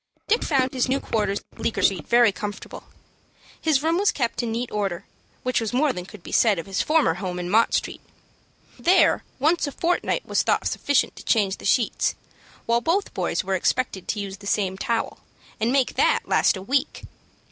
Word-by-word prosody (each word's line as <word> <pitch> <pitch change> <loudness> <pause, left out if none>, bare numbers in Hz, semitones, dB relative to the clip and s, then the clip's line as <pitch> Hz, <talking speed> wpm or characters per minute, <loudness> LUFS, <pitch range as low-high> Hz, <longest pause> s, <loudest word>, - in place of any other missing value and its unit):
Dick 455 +3 +2
found 265 -4 +1
his 255 0 0
new 270 +1 +1
quarters 205 -5 -1
in - - -24
Bleecker 230 - -1
Street 180 -6 +1
very 235 -2 +5
comfortable. 205 +1 -7 0.8
His 300 -3 +2
room 330 +3 +2
was 405 - +3
kept 245 -2 -2
in 235 -2 -3
neat 235 +2 -3
order, 195 -5 -2 0.4
which 255 -1 0
was 225 +1 -3
more 275 +2 +2
than 180 0 -7
could 205 -5 -13
be - - -9
said 215 -5 +4
of 165 - -5
his 195 -1 -1
former 310 - +2
home 180 0 -5
in 180 0 -4
Mott 225 +2 +3
Street. - - -3 0.8
There 370 +2 +4
once 315 +4 +2
a - - -4
fortnight 350 - -1
was - - +1
thought - - 0
sufficient 285 -1 +1
to - - -10
change 200 -4 +1
the - - -12
sheets, 230 +3 +1 0.5
while 235 +1 +2
both 365 +8 0
boys - - -1
were 190 +1 -2
expected 190 0 -1
to 210 - -2
use 195 -1 -5
the 200 0 -10
same 195 -2 0
towel, 230 +4 -2 0.4
and 225 +2 +1
make 265 -1 +2
that - - +2
last - - +2
a 190 - -8
week. 275 +7 -1
230 Hz, 200 wpm, -24 LUFS, 195-275 Hz, 0.8 s, very